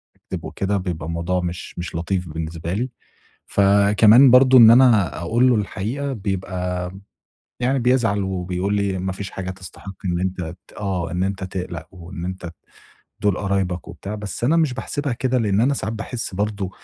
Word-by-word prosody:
أكدب - - -7
وكده، 100 +1 -1
بيبقى 90 -5 -4
الموضوع 85 +2 -1
مش 90 0 -6
مش 85 -1 -5
لطيف 90 +1 -2
بالنسبة 80 +2 -4
لي. 120 +6 -1 0.6
فكمان 105 +5 +6
برضه 130 0 +7
إن 115 -2 +10
أنا 115 -7 +5
أقول 120 +9 +2
له 120 - +4
الحقيقة، 115 +7 -2
بيبقى 90 -4 -3 0.7
يعني 130 +2 +2
بيزعَل 115 -5 +2
وبيقول 95 +1 -2
لي: 100 -2 0
"ما 95 +1 -2
فيش 95 0 -6
حاجة 95 -1 -5
تستحق 95 +1 -10
إن 85 -1 0
أنتَ 95 0 -2 0.3
ت" - - -19
آه، 90 -5 -2
"إن 90 +1 -1
أنتَ 95 0 -2
تقلَق، 90 -4 -5
وإن 85 -1 -8
أنتَ 95 0 -5
ت 85 - -10 0.7
دُول 100 -3 +2
قرايبَك 95 -3 -1
وبتاع." 100 +2 -7
بس 105 +1 -5
أنا 155 +7 +3
مش 155 -6 +2
باحسِبها 140 +1 -3
كده، 130 +1 0
لإن 105 -3 +1
أنا 135 +4 +3
ساعات 110 -2 -3
باحس 115 -1 -5
برضه 100 -1 -2
95 Hz, 170 wpm, -21 LUFS, 90-115 Hz, 0.7 s, إن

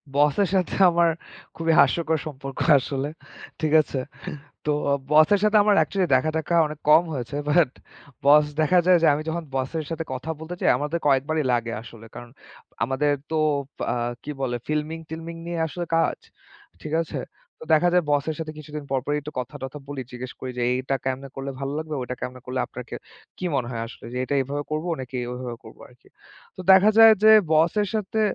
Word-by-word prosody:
বসের 150 +7 +3
সাথে 185 -2 0
আমার 170 0 +3 0.5
খুবই 165 0 0
হাস্যকর 160 -1 +3
সম্পর্ক 135 -2 -8 0.2
আসলে। 135 +2 -3 0.5
ঠিক 155 -1 0
আছে। 140 -2 -5 0.7
তো 150 - +1 0.4
বসের 155 +7 +5
সাথে 215 0 +4
আমার 205 -1 +4
অ্যাকচুয়ালি 195 -3 +1
দেখা-টেখা 155 +5 0
অনেক 150 0 -8
কম 155 +3 +7
হয়েছে। 130 0 -5
বাট 155 -2 +4 0.6
বস 150 +1 +7 0.2
দেখা 180 +4 +4
যায় 180 -1 +6
যে, 165 - +4
আমি 145 - -2
যখন 170 +1 -3
বসের 135 +5 -2
সাথে 165 0 -3
কথা 130 +4 -6
বলতে 160 +2 -7
যাই, - - +3
আমাদের 150 +5 -2
কয়েকবারই 145 +3 +2
লাগে 120 -1 -1
আসলে 115 -1 -13
কারণ 120 0 -9 0.5
আমাদের 135 +4 +1 0.2
তো 160 - 0 0.5
আ - - 0 0.3
কি 150 - -5
বলে, 125 -2 -1
ফিল্মিং-টিল্মিং 160 +2 -4
নিয়ে 170 -1 -3
আসলে 175 +2 -5
কাজ। 165 - +1 0.6
ঠিক 155 - -6
আছে, 160 - -6 0.4
তো - - -8
দেখা 155 +3 +4
যায়, 180 -1 +4
বসের 145 +2 0
সাথে 160 -1 -4
কিছুদিন 150 0 -7
পরপরই 140 +3 0
একটু 150 +1 -8
কথা-টথা 130 +3 -7
বলি। 140 -2 -5
জিজ্ঞেস 125 +1 -7
করি 130 - -5
যে, - - -1
এইটা 130 +2 -1
কেমনে 135 +1 -3
করলে 135 0 -4
ভালো 135 0 -3
লাগবে, 155 -1 -4
ওইটা 125 0 -4
কেমনে 125 0 -6
করলে 130 0 -3
আপনাকে - - -8 0.4
কি 185 - -5
মনে 125 -3 -1
হয় 115 -1 -4
আসলে 120 - -12
যে, - - -3
এটা 140 - -2
এভাবে 140 +2 -3
করব 155 +2 -2 0.2
নাকি 130 0 -6
ওইভাবে 125 -1 -5
করব - - -14
আরকি। - - -23 0.5
তো - - -17
দেখা 190 +2 +7
যায় 225 0 +9
যে, 220 - +8 0.2
বসের 170 +7 +3
সাথে 215 +1 -1
150 Hz, 180 wpm, -24 LUFS, 130-165 Hz, 0.7 s, যায়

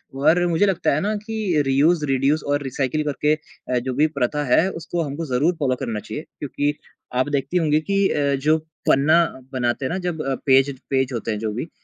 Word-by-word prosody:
और 160 +6 +3
मुझे 170 +4 +2
लगता 190 -6 +1
है 145 - +1
ना 210 +2 0
कि 215 -9 0
रियूज़, 150 +4 +3
रिड्यूस 140 +2 +1
और 145 0 0
रिसाइकिल 135 +2 -1
करके 150 +1 +1
अ, 150 -4 -5
जो 130 +1 -4
भी 150 +5 +3
प्रथा 145 +4 0
है 185 - +4
उसको 170 0 -4
हमको 150 +2 -4
ज़रूर 150 +8 +2
फ़ॉलो 130 -3 +1
करना 110 -2 -3
चाहिए 150 +8 -7 0.2
क्योंकि 145 +1 -1 0.4
आप 130 +3 +1
देखती 145 +5 -1
होंगी 155 -3 +2
कि 195 0 +3
अ, 140 -1 +1
जो 150 +4 +2 0.3
पन्ना 155 +5 +5 0.3
बनाते 125 +1 -1
हैं - - -2
ना 185 - -1
जब 160 -3 -2
अ, 135 -1 0
पेज 135 +1 +4 0.2
पेज 130 -1 0
होते 115 -1 -3
हैं 105 - -3
जो 110 0 -2
भी 115 - -3
अ, - - -20
145 Hz, 215 wpm, -22 LUFS, 135-160 Hz, 0.4 s, पन्ना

